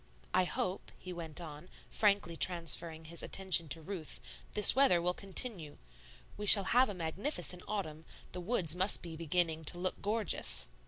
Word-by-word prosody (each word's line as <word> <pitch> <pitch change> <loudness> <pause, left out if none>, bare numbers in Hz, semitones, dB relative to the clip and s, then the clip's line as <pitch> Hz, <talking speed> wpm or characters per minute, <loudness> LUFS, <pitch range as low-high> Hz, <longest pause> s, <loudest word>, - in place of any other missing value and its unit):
"I 185 0 +1
hope," 185 +1 -6
he 185 - -11
went 165 -2 -8
on, 155 0 -12 0.2
frankly 200 -5 -1
transferring 165 -2 -1
his 165 +1 -8
attention 185 -4 0
to 160 +2 -3
Ruth, 180 -3 -8 0.4
"this 210 - +8
weather 265 -10 +2
will 175 +1 -2
continue. 190 -5 -4 0.6
We 210 - -5
shall 200 -1 +12
have 250 0 +2
a 205 - -7
magnificent 180 - -4
autumn; 160 -7 -7 0.3
the 180 - -7
woods 175 -5 -2
must 185 +3 0
be 165 -2 -10
beginning 165 0 -2
to 175 - -2
look 185 +1 -3
gorgeous." 210 - -1
180 Hz, 160 wpm, -31 LUFS, 165-200 Hz, 0.6 s, shall